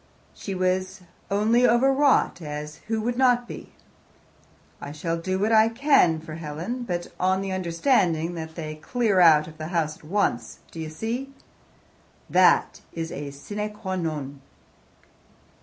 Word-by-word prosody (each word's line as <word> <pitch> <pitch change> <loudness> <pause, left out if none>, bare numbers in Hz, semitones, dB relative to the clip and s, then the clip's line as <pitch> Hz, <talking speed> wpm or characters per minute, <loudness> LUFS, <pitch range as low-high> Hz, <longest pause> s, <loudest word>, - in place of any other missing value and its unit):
She 195 - -6
was 185 +1 -1 0.3
only 215 +5 +2
over 245 +3 +4
wrought, 275 -8 +2
as 150 0 -6
who 220 0 -1
would 240 +2 -2
not 245 -2 +3
be? - - -9 1.1
I 145 - -6
shall 165 +3 -3
do 185 +3 -2
what 210 +3 0
I 220 0 +5
can 230 - +3
for 155 0 -9
Helen, 165 +10 -5
but 175 -4 -3
on 190 +1 +1
the 195 - -4
understanding 175 - +1
that 160 -1 -7
they 155 -2 -5
clear 210 +4 0
out 155 -3 +6
of 155 0 -13
the 155 - -5
house 160 -3 -1
at - - -24
once. 150 - -1
Do 165 - -9
you 160 -1 -4
see? 230 - -4 1.0
That - - +4
is 165 -1 -4
a 145 0 -5
sine 205 +10 -5
qua 190 -3 -4
non." 150 -5 -4
185 Hz, 155 wpm, -25 LUFS, 155-220 Hz, 1.1 s, out